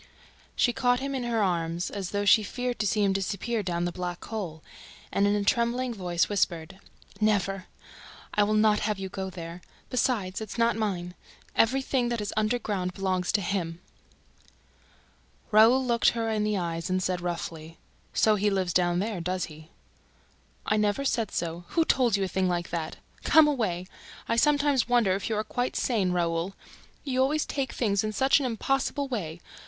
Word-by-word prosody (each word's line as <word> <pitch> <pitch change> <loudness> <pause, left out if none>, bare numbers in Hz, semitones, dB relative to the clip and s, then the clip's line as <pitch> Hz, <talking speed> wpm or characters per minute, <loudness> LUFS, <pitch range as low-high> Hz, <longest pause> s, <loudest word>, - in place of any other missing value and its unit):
She 240 - +2
caught 245 -1 +2
him 275 +1 -3
in 255 -2 -2
her 230 -3 +1
arms, 170 -2 -1
as 195 -3 -4
though 205 0 -1
she 215 +2 +7
feared 245 +4 -3
to 210 - +1
see 210 +1 +1
him 195 -1 +3
disappear 200 +4 -1
down 175 -3 -1
the 175 - -1
black 180 0 -5
hole, 175 -8 -5 0.5
and, 200 - +2
in 205 - +2
a 205 - 0
trembling 235 +3 +1
voice, 175 -5 0
whispered: 185 -2 -1 0.4
"Never!... 195 -3 +1 0.7
I 210 - +3
will 210 +1 +2
not 215 -1 +4
have 210 -1 -1
you 190 -1 -5
go 190 0 -4
there!... 170 -1 -8 0.3
Besides, 220 -7 0
it's 215 +1 -6
not 230 0 +3
mine... 185 -5 -2 0.4
EVERYTHING 260 +1 +2
THAT 235 -1 -1
IS 205 -1 -3
UNDERGROUND 210 -4 -1
BELONGS 185 -2 0
TO 205 - +1
HIM!" 175 -3 -2 1.7
Raoul 230 +5 +6
looked 235 -1 +4
her 225 -1 0
in 215 -1 0
the 210 -1 0
eyes 170 -1 -3
and 185 0 0
said 180 -1 -1
roughly: 165 -2 -5 0.3
"So 215 - +4
he 210 0 +2
lives 190 -3 0
down 175 -1 +2
there, 200 -1 -2
does 180 +1 -1
he?" 155 +1 -14 1.0
"I 215 - +1
never 210 +6 +1
said 230 -6 0
so... 170 +1 -4
Who 330 - +1
told 245 -8 +3
you 195 - 0
a - - 0
thing 185 0 0
like 175 -1 -2
that? 165 -2 -3 0.3
Come 315 -1 +6
away! 215 -11 -1 0.4
I - - +1
sometimes 285 -1 +3
wonder 235 -6 +4
if 195 +3 -2
you 220 - 0
are 215 - 0
quite 245 +3 -2
sane, 205 -7 +1
Raoul... 170 +1 -1 0.5
You 260 -2 0
always 295 +3 +2
take 275 -2 -2
things 200 -4 0
in 215 - -1
such 265 +5 +4
an 270 - -1
impossible 270 +4 -1
way 175 -10 -4
205 Hz, 180 wpm, -27 LUFS, 180-235 Hz, 1.7 s, she